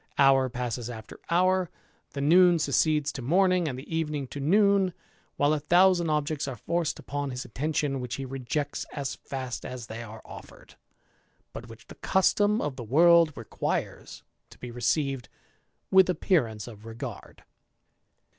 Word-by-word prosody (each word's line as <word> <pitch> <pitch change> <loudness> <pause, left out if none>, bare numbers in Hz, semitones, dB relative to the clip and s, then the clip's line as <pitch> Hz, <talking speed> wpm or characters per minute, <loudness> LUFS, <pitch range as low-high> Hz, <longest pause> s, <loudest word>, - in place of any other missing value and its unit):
Hour 135 -1 +4
passes 120 -1 -4
after 110 -2 -9
honi; 185 +2 +2 0.5
the 140 - -4
noon 175 +4 +5
succeeds 150 -1 +1
to 135 - -7
morning, 180 +5 +2
and 130 -4 -4
the 145 +5 -6
evening 150 -3 -2
to 145 - -7
noon, 200 +5 +3
X 180 - -7 0.4
THE - - -1
IDLER. 150 +1 +3
285 - - -22
a - - -33
thousand 175 -1 +4
objects 150 -1 -1
are 135 - -4
forced 170 +7 -2
upon 145 0 -4
his 125 0 -5
attention,. 140 0 -2
he 135 +3 -4
rejects 135 +3 -4
as 140 -2 -3
fast 130 -3 -6
as 125 -2 -7
they 115 +1 -7
are 110 -1 -10
offered, - - -13 0.8
but 120 - -8
which 115 - -13
the 190 +2 +1
m 210 +2 +2
of 145 -3 -3
the 120 - -6
world 165 +6 +5
requires 115 - -4 0.3
to - - -16
be 125 - -8
received 135 +1 -1 0.6
with 190 -1 +6
appearance 120 - 0
;ard. 115 0 -9
145 Hz, 155 wpm, -27 LUFS, 125-170 Hz, 0.8 s, with